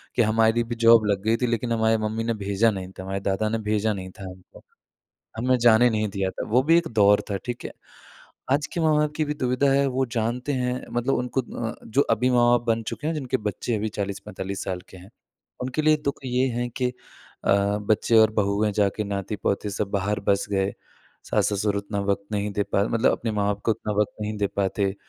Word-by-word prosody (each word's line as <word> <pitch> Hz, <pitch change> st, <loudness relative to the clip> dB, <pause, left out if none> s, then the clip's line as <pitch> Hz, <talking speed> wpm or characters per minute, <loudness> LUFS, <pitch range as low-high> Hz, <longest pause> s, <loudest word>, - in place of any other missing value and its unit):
कि 120 Hz, -, +3 dB
हमारी 110 Hz, +1 st, +3 dB
भी 120 Hz, +1 st, -5 dB
जॉब 115 Hz, -2 st, +7 dB
लग 95 Hz, -1 st, -1 dB
गई 110 Hz, +1 st, +2 dB
थी 125 Hz, -, +2 dB
लेकिन 115 Hz, 0 st, -1 dB
हमारी 110 Hz, 0 st, +2 dB
मम्मी 110 Hz, +1 st, -2 dB
ने 115 Hz, -, 0 dB
भेजा 105 Hz, +3 st, +3 dB
नहीं 95 Hz, -2 st, -6 dB
था, 95 Hz, -, -9 dB
हमारे 95 Hz, +1 st, -3 dB
दादा 100 Hz, +2 st, -1 dB
ने 115 Hz, -, 0 dB
भेजा 110 Hz, 0 st, +1 dB
नहीं 95 Hz, -2 st, -6 dB
था -, -, -7 dB
हमको, 90 Hz, 0 st, -15 dB, 0.7 s
हमें 125 Hz, +3 st, +2 dB
जाने 120 Hz, 0 st, +5 dB
नहीं 110 Hz, -1 st, 0 dB
दिया 95 Hz, -1 st, -2 dB
था, -, -, -6 dB
वो 125 Hz, +4 st, +3 dB
भी 165 Hz, +4 st, +4 dB
एक 170 Hz, -, -2 dB
दौर 105 Hz, -2 st, +4 dB
था, 100 Hz, -, 0 dB
ठीक 120 Hz, -1 st, -5 dB
है? -, -, -6 dB, 0.8 s
आज 145 Hz, +1 st, +1 dB
के 170 Hz, -, -1 dB
माँ 155 Hz, -1 st, +3 dB
बाप 150 Hz, 0 st, +1 dB
की 155 Hz, -, +1 dB
भी 150 Hz, 0 st, -3 dB
दुविधा 125 Hz, +1 st, +1 dB
है 140 Hz, +1 st, +3 dB
वो 130 Hz, +1 st, 0 dB
जानते 120 Hz, +5 st, -1 dB
हैं 125 Hz, -1 st, -1 dB, 0.2 s
मतलब 120 Hz, +3 st, 0 dB
उनको 125 Hz, +2 st, -1 dB, 0.3 s
अ, -, -, -8 dB
जो 115 Hz, +5 st, +1 dB
अभी 125 Hz, +3 st, +2 dB
माँ 120 Hz, -1 st, +4 dB
बाप 120 Hz, 0 st, +2 dB
बन 115 Hz, 0 st, +1 dB
चुके 150 Hz, +7 st, -5 dB
हैं, 165 Hz, -, 0 dB
जिनके 135 Hz, -4 st, -1 dB
बच्चे 105 Hz, +1 st, -3 dB
अभी 110 Hz, +1 st, -2 dB
40-45 100 Hz, -1 st, -4 dB
साल 90 Hz, -1 st, -3 dB
के -, -, -12 dB
हैं, 95 Hz, +4 st, -14 dB, 0.5 s
उनके 130 Hz, +4 st, -2 dB
लिए 155 Hz, 0 st, +5 dB
दुःख 140 Hz, -, -1 dB
ये 125 Hz, +1 st, +1 dB
है 120 Hz, +1 st, -1 dB
कि 125 Hz, -1 st, +1 dB, 0.6 s
अ, 100 Hz, +1 st, +2 dB
बच्चे 110 Hz, +2 st, +2 dB
और 110 Hz, -1 st, +6 dB
बहुएँ 105 Hz, 0 st, +1 dB
जा 100 Hz, 0 st, +2 dB
के 110 Hz, -, -1 dB
नाती-पोते 100 Hz, +1 st, -2 dB
सब 100 Hz, 0 st, -3 dB
बाहर 100 Hz, +1 st, -1 dB
बस 100 Hz, 0 st, +2 dB
गए, 95 Hz, 0 st, +1 dB, 0.5 s
सास-ससुर 100 Hz, 0 st, 0 dB
उतना 100 Hz, 0 st, -3 dB
वक़्त 100 Hz, 0 st, -1 dB
नहीं 105 Hz, 0 st, -1 dB
दे 100 Hz, -, 0 dB
पा 100 Hz, -, 0 dB
मतलब 115 Hz, +2 st, +2 dB
अपने 115 Hz, -, -2 dB
माँ-बाप 100 Hz, -1 st, 0 dB
को -, -, +2 dB
उतना 105 Hz, -, -4 dB
वक़्त 105 Hz, -, 0 dB
नहीं 105 Hz, 0 st, -3 dB
दे 100 Hz, -, +1 dB
पाते, 100 Hz, 0 st, 0 dB
110 Hz, 220 wpm, -24 LUFS, 100-125 Hz, 0.8 s, जॉब